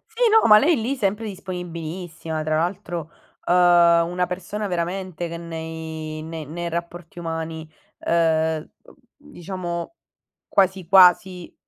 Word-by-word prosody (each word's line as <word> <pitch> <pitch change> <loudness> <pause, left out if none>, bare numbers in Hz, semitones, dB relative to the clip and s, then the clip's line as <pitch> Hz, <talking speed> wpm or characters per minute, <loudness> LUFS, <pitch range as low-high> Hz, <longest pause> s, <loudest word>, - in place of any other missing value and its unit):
Sì, - - -6
no, 445 0 +5
ma 210 -1 +9
lei 305 +3 +3
lì 255 +5 -1
sempre 210 -1 -1
disponibilissima. 170 -4 -6
Tra 155 0 -1
l'altro, 175 -2 -3 0.3
ehm, 175 -1 +5
una 180 +1 -1
persona 190 +4 -5
veramente 175 -1 -3
che 170 - -6
nei 160 -1 -6
ne 160 -1 -6
nei 170 +4 -5
rapporti 170 0 -6
umani, 160 -1 -5 0.3
ehm, 160 -2 +1 0.2
uhm, - - -18 0.2
diciamo 185 - -6 0.5
quasi 190 -2 +1
quasi 180 -1 +5
175 Hz, 125 wpm, -23 LUFS, 160-185 Hz, 0.5 s, ma